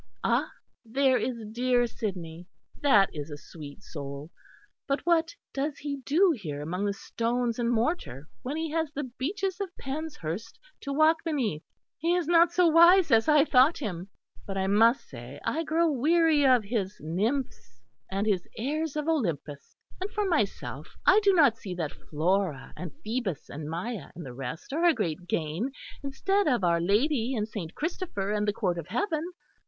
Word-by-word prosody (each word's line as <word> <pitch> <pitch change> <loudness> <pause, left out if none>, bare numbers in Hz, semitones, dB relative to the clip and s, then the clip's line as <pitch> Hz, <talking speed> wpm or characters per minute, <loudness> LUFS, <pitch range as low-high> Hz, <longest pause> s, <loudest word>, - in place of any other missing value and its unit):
Ah! - - +2 0.3
there 260 +2 +2
is 235 -3 -3
dear 245 +1 +2
Sidney; 180 -7 -5 0.3
that 210 -9 +5
is 150 0 -6
a 145 - -6
sweet 145 -1 -11
soul. 140 +1 -7 0.6
But 275 +1 0
what 330 -1 +2 0.2
does 280 +1 -2
he 285 -1 -4
do 325 +8 +3
here 155 - -6
among 180 +6 -2
the 200 - 0
stones 235 +3 -2
and 235 -1 +1
mortar 225 - -1
when 280 +5 -4
he 320 -1 -2
has 320 -2 -1
the 295 0 -3
beeches 360 - -3
of 395 - -2
Penshurst 270 - -5 0.2
to 280 - -5
walk 310 +3 +4
beneath. 250 - -1 0.4
He 335 +3 +2
is 355 -4 0
not 340 0 +5
so 355 0 +4
wise 340 +3 +6
as 225 0 +5
I 300 -1 +6
thought 275 +3 +5
him.... 190 - -5 0.4
But 195 -1 -4
I 190 - 0
must 225 +6 +4
say 125 +2 -10
I 325 - 0
grow 325 +1 +2
weary 305 +1 +3
of 250 -3 +5
his 200 -2 -2
nymphs 185 - -2 0.3
and 195 +2 -1
his 195 -5 0
airs 300 +6 -2
of 300 0 -2
Olympus. 165 - -2 0.3
And 380 - -2
for 420 -1 -1
myself, 315 - -2
I 390 +3 +7
do 405 -1 +5
not 285 - +4
see 185 -4 -6
that 160 -4 -3 0.2
Flora 165 -1 0
and 180 -3 -6
Phoebus 215 - -3
and 150 +1 -6
Maia 180 - -4
and 170 -2 -8
the 125 - -8
rest 135 - -6
are 325 +3 0
a 340 -3 +5
great 170 +1 -3
gain, 170 - -1 0.3
instead 385 +8 0
of 245 -9 +2
Our 170 -1 +3
Lady 235 - +1
and 215 -2 -1
Saint 185 -7 -6
Christopher 305 - -3
and 210 0 0
the 205 - +2
court 180 -5 -1
of 165 - -7
heaven. 315 - -1
235 Hz, 175 wpm, -28 LUFS, -, 0.6 s, I